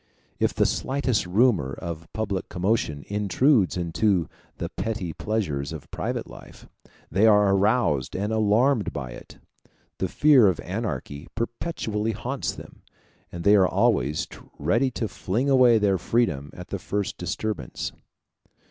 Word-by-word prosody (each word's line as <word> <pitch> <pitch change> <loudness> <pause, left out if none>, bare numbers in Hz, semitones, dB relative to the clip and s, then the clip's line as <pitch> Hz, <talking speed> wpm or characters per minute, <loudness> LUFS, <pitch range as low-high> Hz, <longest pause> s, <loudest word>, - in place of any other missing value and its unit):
If - - +1
the - - +3
slightest 130 -7 0
rumor 95 - +2
of 85 -1 -7
public 105 -4 -3
commotion 90 -6 -1
intrudes 105 - +2
into 90 0 +1 0.3
the - - -4
petty 105 -7 -3
pleasures 75 -11 -2
of - - -9
private - - -3
life, - - -13 0.4
they 100 +6 +4
are 105 -2 +5
aroused 95 - +1
and 105 +3 -1
alarmed 110 +3 +2
by 65 -4 -5
it. - - -12 0.6
The - - 0
fear 145 -7 +5
of 90 -4 +1
anarchy 85 - -4
perpetually 115 -2 -2
haunts 130 +6 -3
them, - - -12 0.5
and 85 -1 -6
they 100 +1 +6
are 95 -2 +5
always 70 +5 +1 0.3
ready 130 +4 +2
to 120 -3 -3
fling 120 +9 -1
away 125 -3 +6
their 100 -3 +2
freedom 80 - 0
at 90 0 -9
the 100 - -3
first 100 +2 -3
disturbance. 110 -1 -3
105 Hz, 140 wpm, -25 LUFS, 85-115 Hz, 0.6 s, they